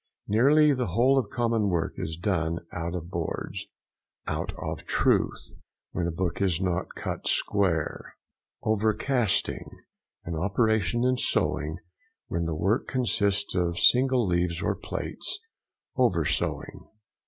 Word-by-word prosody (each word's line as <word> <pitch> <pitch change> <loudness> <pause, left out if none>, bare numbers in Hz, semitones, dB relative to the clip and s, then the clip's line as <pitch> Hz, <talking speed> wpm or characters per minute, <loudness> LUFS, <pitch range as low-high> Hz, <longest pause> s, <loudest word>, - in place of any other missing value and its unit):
Nearly 145 +8 +5
the 125 -2 -1
whole 125 +9 +4
of 130 - -3
common 115 -3 +1
work 85 -3 0
is 80 0 -4
done 85 -3 -1
out 85 0 -3
of 85 0 -6
boards. 85 -3 -4 0.6
OUT - - -2
OF - - -5
TRUTH.—When 85 -2 -1
a - - -1
book 85 +2 -2
is 90 -4 +2
not 95 -1 -2
cut - - -4
square. 90 -7 0 0.5
OVERCASTING.—An 110 -4 -1
operation 110 +6 +1
in 130 0 +2
sewing, 80 -8 0 0.5
when 85 0 -1
the 80 -1 -2
work 95 +9 +1
consists 100 -5 +1
of 85 -2 0
single 125 +2 +5
leaves 85 -2 0
or - - +1
plates. - - -4 0.6
Over 95 - +2
sewing. - - -2
95 Hz, 120 wpm, -27 LUFS, 85-120 Hz, 0.6 s, Nearly